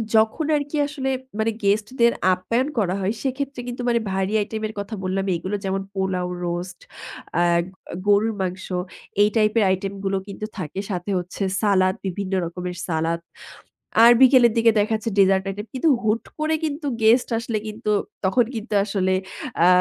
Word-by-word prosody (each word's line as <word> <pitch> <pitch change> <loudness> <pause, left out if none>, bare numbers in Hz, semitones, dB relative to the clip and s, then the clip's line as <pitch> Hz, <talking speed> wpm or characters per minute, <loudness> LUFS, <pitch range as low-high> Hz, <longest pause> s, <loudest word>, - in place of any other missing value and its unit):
যখন 220 +8 +3
আরকি 290 +1 -2
আসলে 270 -2 -3 0.3
মানে 225 +1 +2
গেস্টদের 215 +4 +2 0.2
আপ্যায়ন 230 +9 0
করা 190 -2 +1
হয়, 195 +3 0
সেক্ষেত্রে 275 -1 -3
কিন্তু 245 0 -5
মানে 235 -1 +3
ভারী 190 +2 -1
আইটেমের 215 +1 -4
কথা 205 +2 -5
বললাম 190 +1 -1
এগুলো, 185 +5 -3
যেমন: 195 0 -1
পোলাও, 190 -2 -1 0.2
রোস্ট, 175 +1 -4 0.7
আগ 170 - +3 0.4
গরুর 205 +2 +4
মাংস, 185 +1 -3 0.6
এই 210 - +5
টাইপের 215 0 +3
আইটেমগুলো 195 +1 -1
কিন্তু 200 +2 -6
থাকে। 185 0 -5
সাথে 180 +1 -3
হচ্ছে 180 +3 -4 0.2
সালাদ, 190 -3 +3
বিভিন্ন 190 +1 -3
রকমের 180 +1 -5
সালাদ। 165 0 0 0.9
আর 235 - +9
বিকেলের 255 -3 +7
দিকে 230 0 +6
দেখা 215 +2 0
যাচ্ছে 225 +1 -4
ডেজার্ট 190 -1 +4
আইটেম। 205 +2 -5
কিন্তু 260 +6 +1
হুট 220 +1 +1 0.2
করে 310 +1 +1
কিন্তু 295 0 -3 0.2
গেস্ট 235 +3 +5
আসলে 230 -1 -2
কিন্তু 215 0 -4 0.3
তখন 240 +6 +3
কিন্তু 220 -1 -4
আসলে 190 -2 0 0.5
আ - - +6
205 Hz, 155 wpm, -23 LUFS, 190-235 Hz, 0.9 s, আর